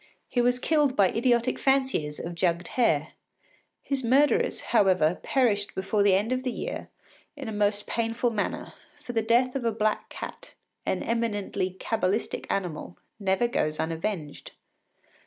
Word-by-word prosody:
He 245 - +1
was 245 +1 +3
killed 290 0 +2
by 195 -5 +5
idiotic 240 +1 +1
fanciers 265 - +1
of 175 - -5
jugged 170 0 0
hare. 160 - +2 0.7
His 275 -2 -2
murderers, 295 - +3
however, 185 -6 +4
perished 215 -7 +1
before 195 +2 0
the 200 -2 +5
end 210 +5 0
of 255 0 +1
the 260 - -2
year - - -5 0.5
in 280 - -6
the 220 - -4
most 205 0 0
painful 230 +1 0
manner; 210 -2 -3 0.3
for 245 - -6
the 225 - +2
death 240 +3 +2
of 270 - -2
a 230 - +2
black 215 0 -1
cat, - - -9 0.3
an - - 0
eminently 205 -5 -1
cabalistic 215 -1 -1
animal, 155 - -3 0.2
never 195 +4 +2
goes 155 -10 -1
unavenged. 165 -1 -3
220 Hz, 150 wpm, -27 LUFS, 185-245 Hz, 0.7 s, by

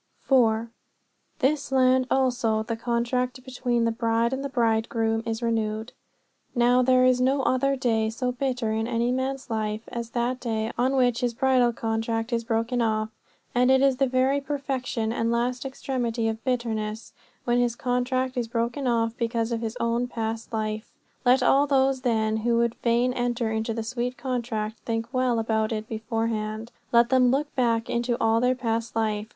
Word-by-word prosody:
4. 225 -5 +3
"In 230 - -9 0.7
this 285 0 0
land 255 -1 +3
also 240 -4 +1
the 230 +1 -3
contract 245 +2 -1
between 245 -2 0
the 230 - +2
bride 230 +1 0
and 265 +1 -3
the 280 - -3
bridegroom 225 -2 +1
is 225 +1 -3
renewed." 220 -1 -1 0.6
Now, 245 +1 +4
there 255 0 +4
is 255 0 +3
no 265 +1 +2
other 275 +2 +2
day 225 -4 +1
so 250 +3 -2
bitter 250 -3 -2
in 220 +1 -1
any 235 0 0
man's 260 0 -3
life 215 0 -2
as 235 -1 -5
that 245 +2 -1
day 220 -2 -2
is - - -8
on 255 +3 +1
which 245 -3 +2
his 240 -2 -1
bridal 255 -2 +3
contract 225 +1 -2
is 230 0 0
broken 230 +1 0
off. 215 -1 0 0.4
And 250 +1 +3
it 265 0 +5
is 270 -2 +3
the 270 0 +2
very 260 +2 +2
perfection 265 -5 -2
and 230 -1 0
last 245 +2 -1
extremity 245 -4 -2
of 225 0 -3
bitterness 225 -4 -2 0.3
when 240 0 +2
his 240 -1 +1
contract 255 +1 -1
is 240 -2 -1
broken 235 +4 -2
off 230 -1 +1
because 230 0 -1
of 230 -1 -1
his 225 +1 -4
own 235 +1 0
past 225 -1 -4
life. 215 0 -3 0.3
Let 250 +1 +5
all 275 +3 +4
those, 270 -1 +2
then, 220 -3 +1
who 230 +1 +1
would 235 0 +2
fain 240 +2 +1
enter 245 -2 -1
into 220 +1 -1
that 225 - -2
sweet 250 +2 -3
contract 235 -4 -3
think 230 +2 -4
well 255 -2 +1
about 220 0 0
it 215 -1 -3
beforehand. 225 0 -3 0.2
Let 235 0 +5
them 255 -1 +4
look 285 +4 0
back 230 -2 +1
into 240 0 -1
all 225 0 +2
their 250 +1 +2
past 230 -2 -2
life. 215 -1 -1
235 Hz, 180 wpm, -25 LUFS, 225-255 Hz, 0.7 s, it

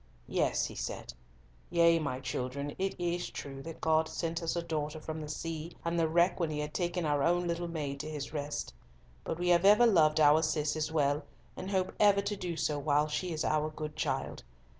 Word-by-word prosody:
"Yes," - - +1
he - - -6
said, - - -5 0.6
"yea, 170 -1 +5
my 140 -4 -2
children, 135 +2 -3
it 190 0 -2
is 175 0 -1
true 135 -1 -7
that 165 +3 -9
God 160 0 +2
sent 165 0 -3
us 165 0 -1
a 170 - -1
daughter 155 -2 -3
from 155 0 -5
the 150 - -6
sea 165 +1 -5
and 170 0 0
the 165 - +3
wreck 170 +3 +3
when 165 -3 0
He 150 - -3
had 150 0 -3
taken 175 -1 -1
our 145 -1 +1
own 175 +3 +2
little 170 0 -2
maid 145 -4 -4
to 155 - -5
His 150 -1 -5
rest. 145 -1 -3 0.5
But 160 - -3
we 175 +1 0
have 175 0 +5
ever 210 +4 +7
loved 160 -9 +4
our 150 +1 +6
Cis 155 -1 0
as 155 0 -2
well, 145 -1 +1 0.3
and 185 - -6
hope 190 -2 0
ever 205 -1 +5
to 205 - -2
do 175 -4 -4
so 150 -2 0
while 145 +1 +2
she 155 +4 -2
is 155 -1 -2
our 155 0 +1
good 155 -1 -6
child. 140 -3 -2
160 Hz, 215 wpm, -31 LUFS, 150-170 Hz, 0.6 s, ever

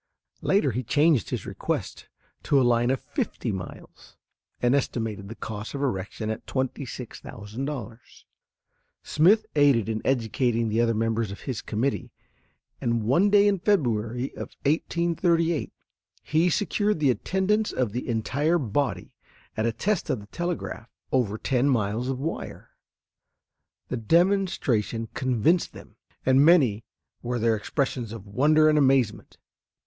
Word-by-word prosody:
Later 190 -9 +2
he 120 +3 -2
changed 145 - +2
his - - -4
request - - -4 0.3
to 140 - +3
a - - +4
line 120 0 +3
of 135 0 +1
fifty - - -3
miles, 95 -3 -9 0.4
and 120 +1 +2
estimated 110 -7 -2
the 115 - -7
cost 110 +3 -6
of 140 - -4
erection 110 -2 -2
at 110 - -7
$26,000. 125 -2 -5 1.0
Smith 205 +8 +4
aided 140 -7 +4
in 110 -1 -2
educating 115 -2 0
the 110 +2 +1
other 115 -1 +2
members 115 0 0
of 100 - -8
his 130 -5 -4
committee, 125 +6 -2 0.7
and 115 -1 0
one 170 - +3
day 205 0 +5
in 200 -2 +2
February 125 - 0
of - - -8
1838 170 +1 +1 0.5
he 160 +3 +2
secured 205 +2 0
the 140 -4 +4
attendance 195 - 0
of 125 -5 -1
the 125 +3 -4
entire 140 +9 +1
body 140 0 -2 0.4
at 110 +1 0
a - - +1
test 185 - -1
of 125 - 0
the 100 - -11
telegraph 170 -4 -4 0.2
over 115 -5 +1
ten 130 +3 +1
miles 115 0 0
of 135 - -1
wire. 150 +5 -5 1.2
The 125 - -2
demonstration 145 - +1
convinced 130 +7 +1
them, - - -13 0.3
and 130 +1 +5
many 135 - +4 0.4
were 120 0 -2
their 115 0 +2
expressions 120 +1 -2
of 115 -3 -8
wonder 150 +9 +4
and 150 -1 +4
amazement. 135 -5 +1
130 Hz, 135 wpm, -26 LUFS, 115-155 Hz, 1.2 s, day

